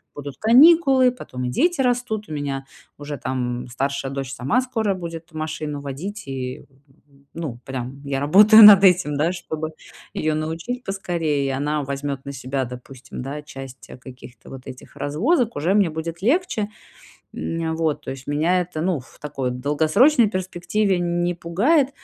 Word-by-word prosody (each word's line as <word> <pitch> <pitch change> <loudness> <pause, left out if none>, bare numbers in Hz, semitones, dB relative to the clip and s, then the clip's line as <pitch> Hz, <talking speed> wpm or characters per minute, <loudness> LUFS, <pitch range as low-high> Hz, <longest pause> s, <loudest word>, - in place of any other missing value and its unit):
будут 140 -2 -8
каникулы, 265 +2 +6
потом 130 - -8
и - - -1
дети 340 - +1
растут. 245 -4 -1
У - - -9
меня 140 -2 -4 0.3
уже, 145 0 -6
там, 125 -1 -3
м, - - -11
старшая 135 +2 -3
дочь 135 -1 -4
сама 170 - +1
скоро 250 -4 -3
будет 165 -2 -8
машину 155 -2 -4
водить, 160 +9 -6
и, 130 -1 -5 0.7
ну, 155 -8 -6
прям, 130 +1 -6
я 140 -1 -2
работаю 210 +10 +8
над 205 -2 +10
этим, 180 -6 +4
да, 160 +4 +1
чтобы 155 -3 -5 0.4
её 155 0 -1
научить 165 +11 -4
поскорее, 165 -7 -2
и - - -1
она 145 +2 -1
возьмёт 140 0 -4
на 140 - -5
себя, 130 0 -3
допустим, 125 +1 -10
да, 140 +3 -5
часть 135 -3 -11
каких-то 125 -1 -13
вот 130 0 -10
этих 130 -1 -11
развозок, 230 - 0
уже 165 +6 0
мне 200 -4 +3
будет 165 +2 -6
легче. 240 - 0 0.6
М, 165 -1 -3
вот, 160 -2 -1
то - - -6
есть 135 -1 -9
меня 160 +5 +1
это, 175 -3 -5
ну, 175 -2 0
в 125 - -17
такой 140 -4 -3
долгосрочной 160 - +3
перспективе 185 0 -1
не 175 0 0
пугает. 245 - +2
155 Hz, 160 wpm, -22 LUFS, 135-200 Hz, 0.7 s, над